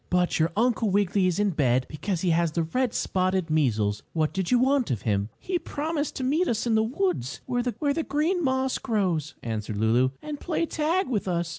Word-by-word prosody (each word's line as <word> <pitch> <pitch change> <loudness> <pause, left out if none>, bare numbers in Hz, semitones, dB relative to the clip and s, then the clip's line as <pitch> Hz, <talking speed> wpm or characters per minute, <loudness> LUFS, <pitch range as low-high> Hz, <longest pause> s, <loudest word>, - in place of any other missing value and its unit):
"But 180 -1 +1
your 160 +1 +2
Uncle 230 -2 +2
Wiggily 195 -1 +2
is 180 - 0
in 205 -1 +2
bed 130 -5 +2
because 170 +3 -3
he 180 - +2
has 165 -1 +1
the 170 - +1
red 250 +9 -1
spotted 185 -2 0
measles. 110 -9 +1
What 155 -2 0
did 190 -2 -2
you 250 - +4
want 265 0 +2
of 115 - -2
him?" 100 -1 0
"He 360 -1 -2
promised 305 -1 -3
to 260 - -3
meet 310 +8 +2
us 230 0 0
in 235 - +1
the 220 - +4
woods, 185 - -1
where 245 -1 0
the 285 +5 -1
green 330 +5 +1
moss 260 -1 0
grows," 175 - -1
answered 110 -2 -3
Lulu, 115 +4 +3
"and 300 -1 -6
play 335 -1 -1
tag 330 +4 0
with 215 -6 -1
us. 170 -2 -1
195 Hz, 205 wpm, -26 LUFS, 155-260 Hz, -, you